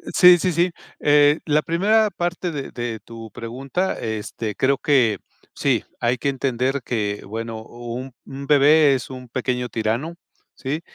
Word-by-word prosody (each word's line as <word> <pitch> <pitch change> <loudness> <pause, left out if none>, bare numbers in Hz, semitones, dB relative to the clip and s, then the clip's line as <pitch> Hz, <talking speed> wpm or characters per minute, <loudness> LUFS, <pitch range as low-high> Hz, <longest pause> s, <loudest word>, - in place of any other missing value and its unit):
Sí, 180 -1 +8
sí, 180 +2 +1
sí. 175 +2 +2 0.3
Eh, 145 +1 +5
la 150 -1 +3
primera 210 +7 +2
parte 175 -1 -3
de 145 -3 -5
de 120 -2 -4
tu 115 -1 -9
pregunta, 135 - -3
este, 110 0 -4
creo 135 +1 +2
que 125 -10 +3 0.3
sí, - - +1 0.2
hay 120 +1 +1
que 140 - -1
entender 135 0 -1
que, 105 -4 -2
bueno, 115 +1 -5
un 120 +3 -7
un 140 +1 -8
bebé 145 0 +6
es 130 - -5
un 125 -1 -9
pequeño 125 0 -2
tirano, 115 +10 -2 0.4
¿sí? 145 +4 -3
135 Hz, 155 wpm, -22 LUFS, 115-150 Hz, 0.4 s, Sí